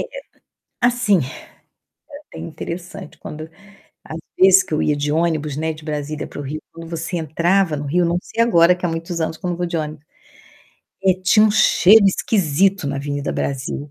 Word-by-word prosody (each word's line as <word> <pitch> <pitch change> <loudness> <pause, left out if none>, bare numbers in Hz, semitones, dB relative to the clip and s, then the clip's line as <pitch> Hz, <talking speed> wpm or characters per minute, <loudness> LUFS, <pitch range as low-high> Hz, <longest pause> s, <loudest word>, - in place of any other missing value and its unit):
eh, - - -6 0.6
assim, 240 -5 +2
é 130 -3 -6 0.9
até - - -12
interessante 175 +4 -8
quando 155 +1 -8 0.5
às 160 - -7 0.2
vezes 190 0 +6
que 175 - -7
eu 155 - +1
ia 150 - +1
de 145 0 -2
ônibus, 155 -3 -1
né, 160 +1 -1
de 155 0 -14
Brasília 150 -1 -4
para - - -10
o - - -3
Rio, 145 +2 -6
quando 165 0 -10
você 165 +1 -4
entrava 170 +2 +1
no 145 0 -5
Rio, 175 +5 +1
não 170 +1 0
sei 230 - -3
agora, 180 -6 +5
que 180 - -5
há - - 0
muitos 165 +1 -4
anos 160 0 -2
que - - -10
eu - - 0
não 175 - -3
vou 175 - -1
de 170 -1 -3
ônibus, 150 -1 -5 1.0
eh, 190 -1 +5
tinha 210 +3 +5
um 215 - +4
cheiro 210 0 +5
esquisito 190 -2 +1
na 140 0 -2
Avenida 145 +1 -3
Brasil. 140 +1 -4
165 Hz, 195 wpm, -20 LUFS, 150-185 Hz, 1.0 s, vezes